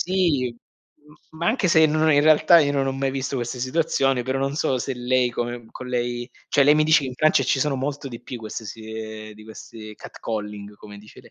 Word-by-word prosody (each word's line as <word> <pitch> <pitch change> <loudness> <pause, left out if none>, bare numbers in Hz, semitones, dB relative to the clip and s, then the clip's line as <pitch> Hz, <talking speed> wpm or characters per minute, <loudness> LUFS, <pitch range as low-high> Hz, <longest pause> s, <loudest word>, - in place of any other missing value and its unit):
sì, 170 -9 +1
m 150 +5 -23 0.3
ma 170 - -2
anche 220 -3 +1
se 160 -1 +5
n - - -2
no, 155 0 +3
in 145 - +5
realtà 155 +2 +6
io 145 - +1
non 135 -1 0
ho 135 - -1
mai 135 0 -1
visto 135 0 -3
queste 125 0 -4
situazioni, 135 -2 +1
però, 130 +1 -1
non 135 +1 -1
so 150 -4 0
se 135 - -3
lei, 125 0 +1
come 120 -1 -4
con 130 - -8
lei 120 0 -2 0.2
cioè 140 - +4
lei 145 +2 +6
mi 155 - +4
dice, 155 -2 +4
in 130 -1 -5
Francia 155 0 +3
ci 135 - +1
sono 145 -1 +1
molto 140 +2 -4
di 120 -2 -9
più 125 - -8
queste 110 0 -7
si 110 +1 -8
ehm, 110 -1 -7
di 110 - -14
questi 110 0 -11
catcalling, 105 -2 -6
come 105 0 -12
dice 105 +1 -15
le - - -19
130 Hz, 235 wpm, -23 LUFS, 120-150 Hz, 0.3 s, realtà